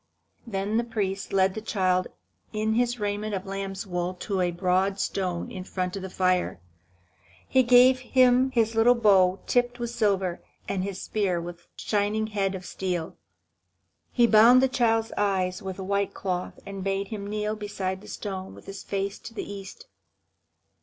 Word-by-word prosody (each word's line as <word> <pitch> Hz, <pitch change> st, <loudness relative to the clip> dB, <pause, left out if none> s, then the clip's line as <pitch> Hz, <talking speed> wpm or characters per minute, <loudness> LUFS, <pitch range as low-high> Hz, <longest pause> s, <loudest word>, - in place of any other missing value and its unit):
Then 205 Hz, 0 st, -1 dB
the 235 Hz, -, +2 dB
priest 200 Hz, -4 st, -3 dB
led 190 Hz, -1 st, +3 dB
the 220 Hz, -, -5 dB
child 185 Hz, -4 st, +1 dB, 0.4 s
in 215 Hz, 0 st, 0 dB
his 240 Hz, +1 st, +1 dB
raiment 205 Hz, 0 st, -2 dB
of 190 Hz, +1 st, -5 dB
lamb's 195 Hz, 0 st, -4 dB
wool 180 Hz, -1 st, -2 dB
to 190 Hz, +1 st, -2 dB
a 180 Hz, -, +2 dB
broad 185 Hz, +3 st, +1 dB
stone 180 Hz, -4 st, -2 dB
in 185 Hz, -, -6 dB
front 185 Hz, -1 st, -3 dB
of 195 Hz, -, -5 dB
the 190 Hz, -, -6 dB
fire. 185 Hz, -, 0 dB, 0.9 s
He 260 Hz, -, +4 dB
gave 255 Hz, +1 st, +6 dB
him 255 Hz, 0 st, +4 dB
his 230 Hz, -3 st, +1 dB
little 230 Hz, +2 st, +5 dB
bow 195 Hz, -5 st, +4 dB
tipped 245 Hz, 0 st, +1 dB
with 235 Hz, -1 st, -4 dB
silver, 195 Hz, -6 st, 0 dB, 0.3 s
and 190 Hz, -2 st, -1 dB
his 195 Hz, -1 st, -4 dB
spear 195 Hz, -5 st, -1 dB
with 175 Hz, 0 st, -8 dB
shining 210 Hz, +1 st, 0 dB
head 200 Hz, -3 st, -1 dB
of 185 Hz, -1 st, -7 dB
steel. 180 Hz, -4 st, -3 dB, 1.0 s
He 240 Hz, -, +4 dB
bound 230 Hz, +3 st, +7 dB
the -, -, +5 dB
child's 225 Hz, -3 st, +1 dB
eyes 190 Hz, -2 st, 0 dB
with 190 Hz, -2 st, -6 dB
a 190 Hz, -, -5 dB
white 200 Hz, +1 st, -1 dB
cloth, 180 Hz, -2 st, -3 dB
and 195 Hz, -1 st, -6 dB
bade 195 Hz, 0 st, -1 dB
him 205 Hz, -2 st, -5 dB
kneel 210 Hz, +1 st, -2 dB
beside 195 Hz, -3 st, -4 dB
the -, -, -13 dB
stone 190 Hz, -2 st, -6 dB
with -, -, -14 dB
his 195 Hz, 0 st, -8 dB
face 200 Hz, 0 st, -3 dB
to 225 Hz, -, -11 dB
the -, -, -4 dB
east. 195 Hz, -1 st, -9 dB
200 Hz, 175 wpm, -26 LUFS, 190-220 Hz, 1.0 s, bound